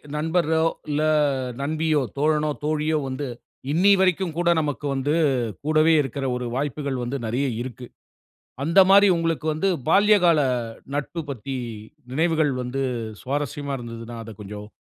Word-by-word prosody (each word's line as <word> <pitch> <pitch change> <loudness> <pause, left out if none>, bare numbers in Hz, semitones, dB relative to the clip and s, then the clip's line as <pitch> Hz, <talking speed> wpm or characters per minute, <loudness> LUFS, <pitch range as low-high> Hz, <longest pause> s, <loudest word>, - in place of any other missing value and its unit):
நண்பரோ, 160 +1 +1 0.2
இல்ல 150 0 0 0.6
நண்பியோ, 155 +1 +1 0.2
தோழனோ, 150 +1 +2
தோழியோ 155 +1 +1
வந்து 135 +2 -4 0.4
இன்னிய 195 +6 +5
வரைக்கும் 185 -3 +1
கூட 175 0 +2
நமக்கு 145 -1 -3
வந்து 135 +3 0 0.5
கூடவே 155 +1 +4
இருக்கிற 135 0 -4
ஒரு 125 0 -3
வாய்ப்புகள் 140 -1 -2
வந்து 125 +3 -3
நெறைய 125 +5 0
இருக்கு. 125 0 -7 0.8
அந்த 165 +6 +4
மாரி 200 +1 +7
உங்களுக்கு 165 -2 -1
வந்து 155 +6 0 0.2
பால்ய 205 +5 +5
கால 170 -3 +5 0.5
நட்பு 145 +4 -3
பத்தி 135 0 -5 0.6
நினைவுகள் 155 +1 +2
வந்து 125 +2 -3 0.4
சுவாரஸ்யமா 145 +1 -3
இருந்ததுன்னா, 115 0 -8
அதை 115 0 -9
கொஞ்சம் 105 +1 -8
150 Hz, 130 wpm, -24 LUFS, 135-160 Hz, 0.8 s, மாரி